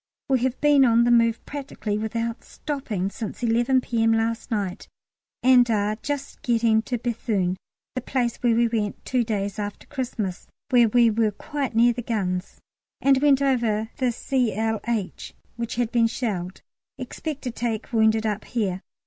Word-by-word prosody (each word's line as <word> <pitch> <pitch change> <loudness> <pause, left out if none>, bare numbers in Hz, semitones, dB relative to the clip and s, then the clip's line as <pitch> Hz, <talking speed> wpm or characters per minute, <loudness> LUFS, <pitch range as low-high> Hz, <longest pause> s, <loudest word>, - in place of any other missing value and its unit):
We 265 -1 +3
have 255 +1 -1
been 295 -2 +5
on 235 -2 +5
the 240 - +3
move 230 -1 +3
practically 270 -7 -4
without 230 +1 -3
stopping 220 -10 -4
since 225 +3 -6
11 240 +3 +3
P.M. 225 -2 +1
last 225 +1 -1
night, 205 -4 -3 0.6
and 250 -1 +6
are 210 -1 +1
just 280 +3 -5
getting 230 -2 +2
to 245 +2 -3
Béthune, 220 -6 -1 0.4
the 255 - -3
place 240 -2 -1
we 235 -1 +3
went 215 -3 -1
to - - -36 0.2
two - - +3
days 205 -2 -2
after 205 -1 -5
Christmas, 235 -9 -4 0.2
where 240 -3 +5
we 235 0 +5
were 220 0 +2
quite 270 +4 -4
near 240 +1 +5
the 245 - -4
guns, 190 -6 -2 0.4
and 270 -1 +3
went 280 -2 +4
over 230 -5 +1
the 255 -2 +1
Cl. 225 -3 0
H. 220 -5 -3 0.2
which 235 -1 -4
had 240 -1 0
been 235 -2 +4
shelled. 195 -7 -4 0.3
Expect 305 -3 -6
to 250 - -2
take 230 -1 -3
wounded 220 0 +3
up 210 -1 -2
here. 195 -6 -2
230 Hz, 165 wpm, -24 LUFS, 215-245 Hz, 0.6 s, and